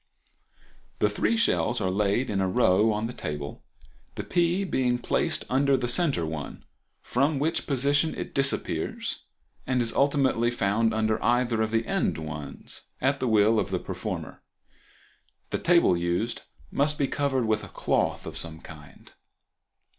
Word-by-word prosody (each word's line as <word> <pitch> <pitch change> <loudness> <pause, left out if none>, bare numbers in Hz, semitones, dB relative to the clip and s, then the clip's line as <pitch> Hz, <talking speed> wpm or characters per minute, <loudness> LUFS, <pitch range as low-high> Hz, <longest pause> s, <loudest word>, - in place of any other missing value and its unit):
The - - +2
three 230 - +1
shells 125 - +2
are 95 - 0
laid 105 +6 +1
in 100 -2 0
a 95 - +1
row 105 +1 +3
on 105 +1 -1
the 120 - -4
table, 75 -7 -5 0.5
the - - -4
pea 175 +2 +1
being 125 -9 +1
placed 120 - -1
under 135 +1 +3
the 125 -1 -2
center 125 - +1
one, 80 -2 -6 0.4
from 140 +4 +1
which 160 +4 -1
position 145 +3 +2
it - - -6
disappears 135 0 -1 0.4
and 130 -1 +1
is 115 -1 0
ultimately 135 -4 +2
found 115 -1 +1
under 110 0 0
either 120 -2 +2
of 110 - +1
the 115 +1 0
end - - 0
ones 75 -2 -7
at 140 +2 +1
the 130 - -1
will 110 0 +4
of - - -1
the 95 - 0
performer. - - -5 1.1
The - - -1
table 170 - +4
used 85 +7 -1 0.3
must 150 +1 +1
be 140 - +1
covered 135 -4 0
with 110 -1 0
a - - -7
cloth - - 0
of - - -6
some 80 -1 -7
kind. 75 -3 -14
120 Hz, 155 wpm, -27 LUFS, 100-140 Hz, 1.1 s, will